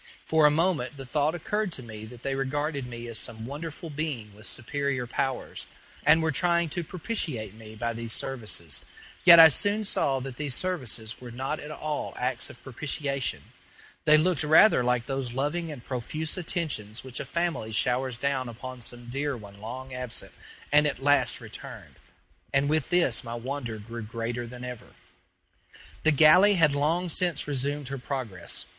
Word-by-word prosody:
For 160 -1 +5
a - - +6
moment 150 -4 +1
the 135 - -7
thought 150 +4 +1
occurred 210 +3 -1
to 130 - -7
me 110 -2 -8
that 120 +2 -12
they 135 - -1
regarded 140 0 -2
me 120 -1 -7
as 115 -1 -4
some 110 0 -5
wonderful 150 +4 -6
being 140 -9 -3
with 105 +2 -6
superior 135 +1 -1
powers, 130 +1 -2 0.4
and 160 0 +5
were 160 - +2
trying 170 +2 +2
to 175 +3 -3
propitiate 155 - -3
me 110 0 -11
by 115 +1 -2
these 115 0 -4
services; 105 - -1 0.4
yet 170 -2 +11
I 165 - +12
soon 205 +9 +1
saw 140 -9 +1
that 130 -1 -7
these 145 -4 -1
services 125 -12 -1
were 125 - -8
not 130 +6 -3
at 150 - -8
all 150 -1 -4
acts 125 -1 -2
of 120 - -14
propitiation; 140 0 -2 0.6
they 155 0 +7
looked 170 +1 +2
rather 155 -1 +6
like 125 -1 +1
those 135 -2 -3
loving 150 +5 -1
and 125 -5 -9
profuse 150 +5 -3
attentions 155 - -3
which 130 -2 -5
a - - -2
family 170 -10 -1
showers 125 +2 +2
down 130 -1 -1
upon 125 +2 -8
some 120 +1 -3
dear 140 +2 -2
one 100 -2 -12
long 130 +4 -7
absent 125 -2 -4 0.4
and 150 +1 +6
at 135 -2 -3
last 145 0 +3
returned, - - -9 0.5
and 140 +1 +2
with 155 -1 +1
this 170 -10 +3
my 115 -1 -5
wonder 120 -1 -4
grew 115 +3 -7
greater 115 +2 -4
than 125 +1 -9
ever. 125 -2 -8 1.1
The 160 - +4
galley 160 +7 +7
had 155 -5 +5
long 160 +5 +1
since 175 -3 0
resumed 140 0 -2
her 140 -1 -4
progress. 120 -9 -3
135 Hz, 175 wpm, -27 LUFS, 120-155 Hz, 1.1 s, I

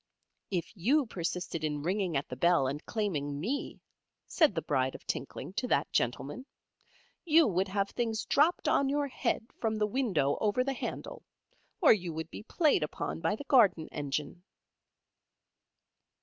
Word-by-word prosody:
"If 180 +2 -3
you 260 - +2
persisted 175 -4 -4
in 150 -2 -2
ringing 180 -2 0
at 140 - -3
the 125 - -6
bell 170 +1 +3
and 140 +4 -3
claiming 150 -10 -2
Me," 250 - -3 0.5
said 315 -5 +3
the - - 0
Bride 130 -2 0
of - - -11
Tinkling - - -5
to - - -2
that - - +1
gentleman, 140 - -2 0.8
"you 330 -1 +5
would 190 -1 +1
have 200 +1 -1
things 225 -2 -2
dropped 310 +5 +2
on 275 - +3
your 290 0 0
head 225 - -1
from 220 -1 0
the 215 0 +1
window 200 - 0
over 215 +4 +2
the 270 +1 -1
handle, - - -6 0.6
or 310 - +8
you 180 -5 -3
would 160 +1 -5
be - - -7
played 295 - +2
upon 150 - -3
by 210 - +1
the 255 - -8
garden 220 - +4
engine." 145 +3 -4
195 Hz, 160 wpm, -31 LUFS, 155-250 Hz, 0.8 s, or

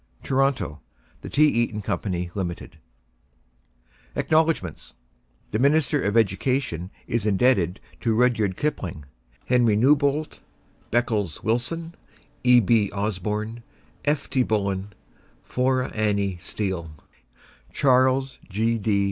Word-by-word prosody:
TORONTO: 135 - 0 0.4
THE - - -7
T. 150 - +3
EATON 115 -6 0
Co - - -1 0.3
LIMITED 90 -4 -5 1.4
ACKNOWLEDGEMENTS 155 - 0 0.6
THE 110 - 0
MINISTER 145 +1 +3
OF 100 +3 +1
EDUCATION 105 - 0 0.2
is 110 -2 -1
indebted 100 -3 +2 0.2
to 115 -2 0
Rudyard 110 -5 +2
Kipling, 95 - -3 0.4
Henry 120 -4 +3
Newbolt, 140 +4 +2 0.5
Beckles 110 -6 0
Willson, 125 +10 -1 0.5
E. 125 -1 +7
B. 110 -2 +3
Osborn, 105 +3 -3 0.4
F. 145 0 0
T. 130 - +1
Bullen, 100 -3 -1 0.5
Flora 130 0 0
Annie 100 -3 0
Steel; 95 -6 -3 0.8
Charles 130 0 +2
G. 110 +4 0
D. 100 -1 +1
115 Hz, 100 wpm, -24 LUFS, 100-130 Hz, 1.4 s, E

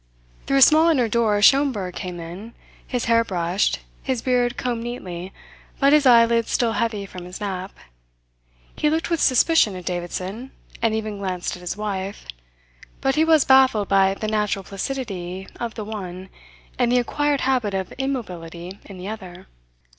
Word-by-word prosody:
Through 275 - +2
a - - +4
small 315 +3 +6
inner 260 -8 +3
door 220 -2 +2
Schomberg 255 -9 +3
came 180 -1 -6
in, 180 +8 -9 0.3
his 245 -2 -2
hair 230 0 +4
brushed, 180 -1 0 0.2
his 260 -4 -2
beard 245 -1 +1
combed 240 -2 -2
neatly, 185 -7 -6 0.5
but 275 +1 +5
his 300 -3 +5
eyelids 230 -1 +5
still 235 -2 +1
heavy 220 -4 -1
from 180 -2 -9
his 180 +1 -9
nap. 190 -2 -4 1.0
He 300 - +1
looked 320 +2 -1
with 335 - +1
suspicion 255 - +4
at 180 -1 -8
Davidson, 185 +7 -4 0.3
and 225 -1 +2
even 215 -2 -4
glanced 185 -2 -3
at 180 - -12
his 180 +2 -4
wife; 200 -2 -4 0.7
but 270 0 +1
he 310 - +3
was 320 -3 +4
baffled 260 -6 +4
by 195 0 +4
the 215 - -4
natural 210 -2 0
placidity 195 -4 -5
of 235 -2 -4
the 215 - -5
one 190 -3 -7 0.5
and 245 -1 +2
the 250 - +4
acquired 290 +3 0
habit 250 -7 0
of 190 -1 -3
immobility 180 -9 -5
in 195 - -11
the 180 +1 -7
other. 190 -5 -8
215 Hz, 165 wpm, -22 LUFS, 190-255 Hz, 1.0 s, small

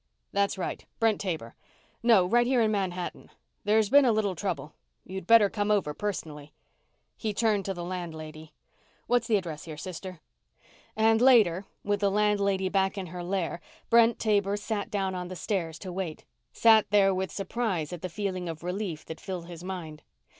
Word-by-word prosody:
That's 200 0 +1
right, 185 - -4 0.2
Brent 225 -2 +2
Taber... 160 - -4 0.5
No, 225 -6 +5
right, 240 +6 +3
here 255 -1 +3
in 215 - +2
Manhattan. 185 -3 -3 0.4
There's 215 0 +3
been 285 +1 +8
a 250 - +4
little 215 -3 +1
trouble. 165 -5 -4 0.3
You'd 190 -1 -7
better 225 -3 +7
come 205 +1 -2
over 195 -8 +1
personally." 150 -6 -5 0.6
He 215 -3 -3
turned 215 -3 +1
to 195 - -2
the 175 - -5
landlady. 160 -3 -6 0.5
"What's 245 -1 +1
the 220 - +4
address 165 -6 -5
here, 155 -2 -8
sister?" 185 +1 -7 0.8
And 220 +1 +3
later, 210 -8 +5 0.2
with 205 0 0
the 200 -1 +2
landlady 200 -2 +1
back 195 +1 +1
in 190 - -3
her 180 -1 -5
lair, 175 -2 -2 0.3
Brent 230 0 +6
Taber 205 -2 +1
sat 205 -1 -3
down 195 -2 -1
on 180 -1 -4
the 185 - -7
stairs 170 -3 -2
to 185 +1 -7
wait; 175 -4 -5 0.3
sat 220 -2 +5
there 195 -2 +4
with 190 0 -2
surprise 195 -6 -2
at 175 - -7
the 185 - -4
feeling 185 -2 -3
of 160 0 -7
relief 180 -3 -4
that 160 0 -8
filled 185 -3 -5
his 170 -1 -10
mind. 170 -5 -6
195 Hz, 175 wpm, -28 LUFS, 175-210 Hz, 0.8 s, been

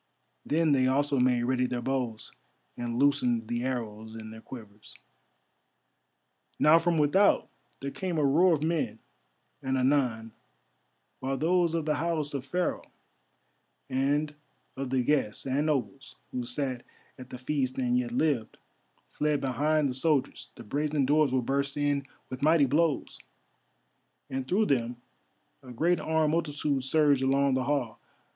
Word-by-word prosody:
Then 160 0 +2
they 130 -2 +3
also 140 +1 +2
made 125 -1 +2
ready 125 0 +1
their 125 -1 -3
bows 125 -4 -3 0.4
and 120 -1 -4
loosened 125 -5 +2
the 120 +1 -2
arrows 110 -4 -4
in 110 -1 -8
their 110 0 -11
quivers. 110 -5 -12 1.6
Now 155 +2 +6
from 170 0 +1
without 155 +7 +3 0.3
there 140 0 -4
came 180 0 -3
a 150 - +2
roar 165 +5 +4
of 150 - -4
men, 165 -1 -1 0.6
and 130 0 -1
anon, 125 -4 +1 0.9
while 135 +1 -2
those 170 +1 +2
of 165 -2 -1
the 150 -1 0
house 155 -2 -1
of 140 -1 -5
Pharaoh, 180 +5 -2 1.0
and 145 +3 0 0.4
of 135 -1 -4
the 130 -1 +1
guests 130 -6 0
and 140 +3 0
nobles, 135 -2 -3 0.2
who 125 -1 -4
sat 130 -1 -3 0.4
at 130 0 -10
the 125 - -7
feast 130 0 -2
and 125 -2 +1
yet 125 -1 0
lived, 125 -4 0 0.5
fled 150 -1 0
behind 145 +3 +1
the 130 - -2
soldiers, 140 +1 0
the - - -10
brazen 145 +4 -1
doors 150 0 +3
were 130 -1 +1
burst 140 +3 -1
in 145 -1 0 0.2
with 130 0 -7
mighty 155 0 +4
blows, 150 +2 0 1.1
and 130 -1 -3
through 210 +4 +2
them 125 - 0 0.7
a 130 - -12
great 165 +8 +1
armed 160 -1 +1
multitude 145 -4 -1
surged 145 0 +3
along 135 +1 +2
the 130 -1 0
hall. 130 -6 -1
135 Hz, 150 wpm, -28 LUFS, 125-150 Hz, 1.6 s, Now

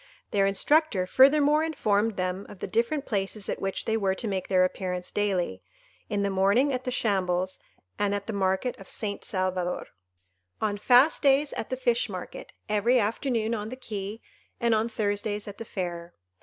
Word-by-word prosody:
Their 195 -1 +3
instructor 225 - +2
furthermore 290 +7 +5
informed 220 -9 0
them 185 +1 -2
of 205 - -10
the - - -4
different 255 +6 0
places 200 -1 -3
at - - -3
which 195 0 -2
they 220 - +1
were 195 -3 +1
to 225 - -4
make 190 -3 -2
their 185 -1 +4
appearance 180 -1 -4
daily: 185 - -1 0.5
in 205 -1 0
the 200 - 0
morning 200 +9 +3
at 255 0 -3
the - - -1
shambles, 185 -6 0 0.4
and 205 0 +1
at 200 0 -4
the 225 - -4
market 190 +5 0
of 195 - -12
St. 205 -2 -4
Salvador; 185 -2 -2 0.7
on 205 -1 0
fast 250 +8 +5
days 280 +1 +3
at - - -4
the 255 - -2
fish 240 -2 +1
market; 185 -2 -7 0.2
every 215 +4 +3
afternoon 225 +1 0
on 215 -1 -3
the 255 - -6
quay, 210 -3 -6 0.4
and 235 -1 +2
on 220 +1 +1
Thursdays 205 -1 -2
at 200 -1 -8
the 230 - -6
fair. 175 -3 -5
205 Hz, 180 wpm, -27 LUFS, 190-235 Hz, 0.7 s, furthermore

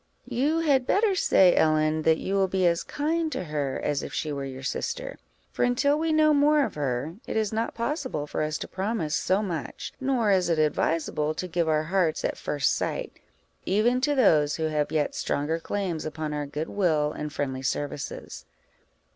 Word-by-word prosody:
"You 300 +6 0
had 270 -5 +2
better 410 0 +3
say, 190 - +4
Ellen, 155 0 +2
that 160 0 +3
you 195 - -3
will 195 -1 +3
be 185 0 0
as 170 -1 +3
kind 315 +2 -1
to 185 - -3
her 145 -4 -2
as 145 -1 0
if - - -6
she 155 - -2
were 140 -1 -3
your 130 0 -7
sister; - - -4 0.3
for - - -1
until 280 +4 +2
we 325 0 0
know 310 -1 +4
more 295 0 +4
of - - -6
her, 145 +3 -3
it - - -2
is 220 -1 0
not 225 +1 -2
possible 255 - -2
for - - -3
us 155 0 -1
to - - -6
promise 190 -5 -2
so 190 +3 +1
much; 170 -7 -5
nor 255 -6 +2
is 185 -2 +2
it 165 - +2
advisable 155 0 0
to 185 - -4
give 170 -1 0
our 155 0 +2
hearts 170 -1 0
at - - -1
first 145 -4 0
sight, - - -3 0.5
even 235 +6 +2
to 290 +2 +2
those 155 - +4
who 160 - -3
have 150 -1 -1
yet 150 -2 0
stronger 155 +3 -1
claims 180 -2 -3
upon 155 -1 -4
our 145 -1 -3
good 150 +3 -4
will 155 -7 +1
and 150 0 -5
friendly 135 -3 -3
services." 145 +1 -4
170 Hz, 195 wpm, -26 LUFS, 150-245 Hz, 0.5 s, say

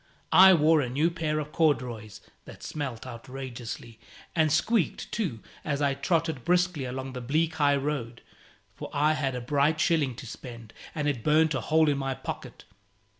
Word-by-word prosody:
I 190 +2 +9
wore 155 0 +4
a 125 - -2
new 150 +7 +1
pair 155 -2 -2
of 150 0 -4
corduroys, 125 - -1 0.2
that - - -12
smelt 135 -7 -5
outrageously 120 -2 -8 0.4
and 160 -2 +3
squeaked, 205 +4 0
too, 170 - -2 0.2
as 145 -2 -2
I 140 -1 +2
trotted 160 -1 -1
briskly 180 -4 +1
along 130 +1 -5
the 125 - -5
bleak 155 +6 0
high 145 -2 +4
road; 135 -5 -3 0.5
for - - -8
I 150 +2 +3
had 135 -4 -1
a 125 - -4
bright 145 +5 +1
shilling 150 -8 +2
to - - -9
spend, 115 -2 -10 0.2
and 150 -2 -1
it 130 -6 -1
burnt 155 +1 +3
a 130 - -1
hole 160 0 +3
in 145 -2 +1
my 135 -1 -2
pocket. - - -8
145 Hz, 175 wpm, -27 LUFS, 125-160 Hz, 0.5 s, I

